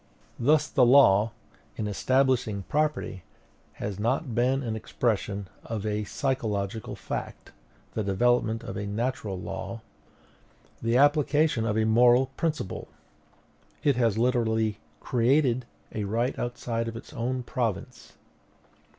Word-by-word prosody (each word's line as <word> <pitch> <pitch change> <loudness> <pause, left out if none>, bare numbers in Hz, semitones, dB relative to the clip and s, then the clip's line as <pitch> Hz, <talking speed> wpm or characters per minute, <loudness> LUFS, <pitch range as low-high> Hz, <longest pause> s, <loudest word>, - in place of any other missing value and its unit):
Thus 150 +5 +3
the 130 - +3
law, 115 -5 +6 0.4
in 110 - -3
establishing 125 -1 +1
property, 150 -8 -1 0.5
has 100 -1 -5
not 120 +4 0
been 130 +4 +2
the 115 -4 -3
expression 105 -3 -2 0.2
of 110 -2 -4
a 105 0 -1
psychological 110 -5 -2
fact, - - -6 0.4
the 110 - -1
development 115 +3 +1
of - - -6
a 100 0 -3
natural 110 -2 -2
law, 115 +4 -6 1.0
the 115 +1 +2
application 145 -3 +3
of 105 -1 0
a 110 - +2
moral 120 +3 +5
principle. 155 - -2 1.0
It 140 -3 +3
has 115 -4 +2
literally 110 -3 +1 0.2
CREATED 125 0 +2 0.3
a 105 -2 -2
right 115 +6 0
outside 120 -1 -2
of 115 0 -5
its - - -11
own 125 +2 -2
province. 115 -5 -3
115 Hz, 120 wpm, -27 LUFS, 110-130 Hz, 1.0 s, law